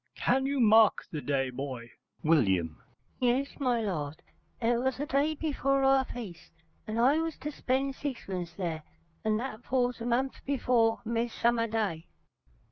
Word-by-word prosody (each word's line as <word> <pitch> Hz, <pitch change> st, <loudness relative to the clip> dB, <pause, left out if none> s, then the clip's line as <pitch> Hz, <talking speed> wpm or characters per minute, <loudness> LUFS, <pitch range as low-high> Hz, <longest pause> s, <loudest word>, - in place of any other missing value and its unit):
Can 265 Hz, +2 st, +1 dB
you 280 Hz, 0 st, -1 dB
mark 220 Hz, -2 st, +5 dB
the 150 Hz, -, -4 dB
day, 135 Hz, -3 st, 0 dB
boy? 125 Hz, -3 st, -6 dB, 0.3 s
W. 95 Hz, -, +2 dB, 0.4 s
Yes, 260 Hz, +4 st, 0 dB
my 250 Hz, -4 st, +1 dB
lord, 155 Hz, -7 st, -3 dB, 0.4 s
it 235 Hz, 0 st, +2 dB
was 260 Hz, +1 st, 0 dB
the 290 Hz, -, -2 dB
day 290 Hz, +2 st, +1 dB
before 275 Hz, -3 st, 0 dB
our 270 Hz, 0 st, +4 dB
feast, 210 Hz, -11 st, -8 dB, 0.4 s
and 215 Hz, +1 st, -2 dB
I 270 Hz, +6 st, +4 dB
was 325 Hz, -1 st, -2 dB
to 300 Hz, -, -5 dB
spend 270 Hz, 0 st, -1 dB
sixpence 195 Hz, -, -5 dB
there, 170 Hz, -3 st, -3 dB, 0.4 s
and 215 Hz, -1 st, +1 dB
that 240 Hz, -2 st, -5 dB
falls 245 Hz, -2 st, 0 dB
a 235 Hz, -, -3 dB
month 255 Hz, +3 st, -1 dB
before 245 Hz, -5 st, +2 dB
Midsummer 235 Hz, 0 st, +1 dB
Day. 210 Hz, -8 st, -2 dB
235 Hz, 150 wpm, -29 LUFS, 175-265 Hz, 0.4 s, mark